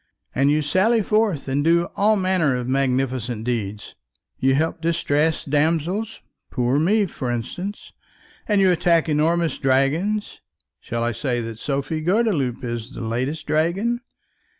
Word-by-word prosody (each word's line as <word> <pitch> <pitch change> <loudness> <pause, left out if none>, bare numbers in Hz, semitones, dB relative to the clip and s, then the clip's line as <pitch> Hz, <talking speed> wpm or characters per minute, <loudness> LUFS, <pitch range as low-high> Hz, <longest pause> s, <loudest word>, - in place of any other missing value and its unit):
And 135 +2 +2
you 150 +1 +2
sally 205 +9 +2
forth 210 -9 +1
and 135 +2 0
do 170 +2 +3
all 215 +2 +3
manner 185 -8 +1
of 125 -1 -3
magnificent 130 -3 -1
deeds. 105 -4 -3 0.5
You 135 0 +3
help 160 +3 -1
distressed 160 -3 0
damsels, 165 +8 0 0.3
poor 125 +2 +1
me, 205 +6 +3
for 135 -8 -5
instance; 150 - -5 0.6
and 210 -2 +3
you 190 -1 +5
attack 170 -1 +2
enormous 160 +1 +1
dragons; 150 +11 0 0.4
shall 115 0 -3
I 120 - 0
say 120 +1 -2
that 115 -1 -7
Sophie 140 +4 -2
Gordeloup 170 - 0
is 120 +1 -5
the - - -7
latest 125 +7 -2
dragon? 190 +10 0
150 Hz, 140 wpm, -22 LUFS, 130-180 Hz, 0.6 s, you